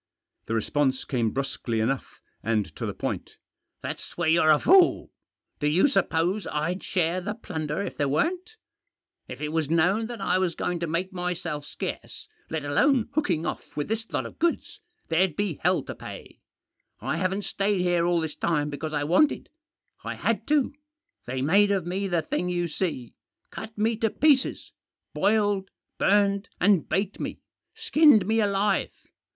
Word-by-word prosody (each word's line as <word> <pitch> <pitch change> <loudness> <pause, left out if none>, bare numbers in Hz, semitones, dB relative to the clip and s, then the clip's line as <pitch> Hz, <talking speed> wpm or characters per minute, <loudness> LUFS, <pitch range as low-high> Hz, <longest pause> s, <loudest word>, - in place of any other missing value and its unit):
The 115 - -1
response 130 +4 0
came 120 -4 0
brusquely 130 -2 -2
enough, 130 +5 -2 0.2
and 110 -2 -1
to - - -4
the - - -3
point. - - -4 0.5
"That's - - -6
where 170 -1 0
you're 160 0 +4
a 155 - +7
fool. 365 - +4 0.5
Do 150 - +1
you 165 - +4
suppose 185 - +1
I'd 165 +5 -2
share 180 0 0
the 205 +4 -4
plunder 160 -5 -4
if - - -6
there 145 -1 +1
weren't? 360 - -1 0.7
If - - -8
it 150 - -2
was 155 -2 -1
known 180 +7 +2
that 240 -2 -7
I 185 - +1
was 180 -3 0
going 175 -1 -2
to 170 - -2
make 175 +4 -2
myself 175 -4 -3
scarce, - - -6 0.2
let 160 -2 -3
alone 240 - +2
hooking 180 - 0
off - - -6
with 145 - -2
this 225 +1 -3
lot - - -1
of - - -10
goods, 340 0 -1 0.3
there'd 170 0 +2
be 200 -7 -2
hell 180 +2 +2
to - - -6
pay. - - -10 0.6
I - - -2
haven't 190 +2 -1
stayed 195 -1 0
here 175 -1 +2
all 175 -1 +2
this 160 -2 -4
time 150 -3 0
because 155 +2 -5
I 145 -1 0
wanted; 185 - +2 0.5
I - - -4
had - - -1
to. 295 -3 +2 0.5
They 130 +1 -2
made 200 +7 +4
of 195 -4 0
me 190 +3 -2
the 175 -3 0
thing 180 +3 -2
you 175 -1 0
see; 155 -7 -3 0.4
cut 220 +1 -8
me 220 +1 +1
to 225 -1 +1
pieces; 280 +2 +2 0.4
boiled, 205 -1 +1 0.3
burned, 200 0 +2
and 195 -3 +3
baked 195 +3 -1
me; - - -4 0.4
skinned 310 - +5
me 220 +3 +2
alive. 200 -1 +1
180 Hz, 170 wpm, -26 LUFS, 155-205 Hz, 0.7 s, a